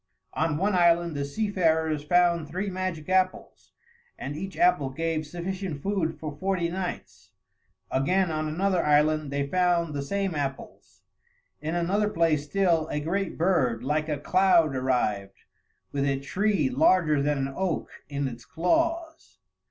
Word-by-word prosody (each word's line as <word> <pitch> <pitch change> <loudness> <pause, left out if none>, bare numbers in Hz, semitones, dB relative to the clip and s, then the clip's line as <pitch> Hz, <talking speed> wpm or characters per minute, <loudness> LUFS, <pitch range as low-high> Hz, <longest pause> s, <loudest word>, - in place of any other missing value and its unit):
On 155 -1 0
one 195 +4 +1
island 170 -2 +3
the 140 - -2
seafarers 160 -3 0
found 170 0 +2
three 190 +4 -3
magic 185 -4 -4
apples, 185 0 -1 0.5
and 145 - -5
each 190 +4 -6
apple 175 -7 +3
gave 155 +2 -2
sufficient 175 -2 -5
food 190 -5 -1
for 150 -2 -6
forty 185 -3 0
nights; 180 0 -6 0.6
again, 180 +7 +1
on 155 0 -2
another 180 +3 0
island, 150 0 +2
they 140 0 -1
found 170 0 +1
the 140 - -2
same 195 +5 -2
apples. 140 -3 -6 0.6
In 160 +2 -3
another 195 +5 +1
place 165 -6 +1
still, 170 -2 +1
a 150 - -2
great 190 +6 -2
bird 140 -10 +1
like 155 +3 -1
a 150 - -1
cloud 165 -1 +3
arrived, 110 -7 -1 0.5
with 140 -1 -1
a 135 -1 0
tree 185 +2 0
larger 150 +3 +3
than 145 +1 +1
an 135 0 -2
oak 185 -4 -2 0.2
in 140 -1 -2
its 120 -2 -8
claws. 325 - -1
165 Hz, 145 wpm, -26 LUFS, 145-185 Hz, 0.6 s, island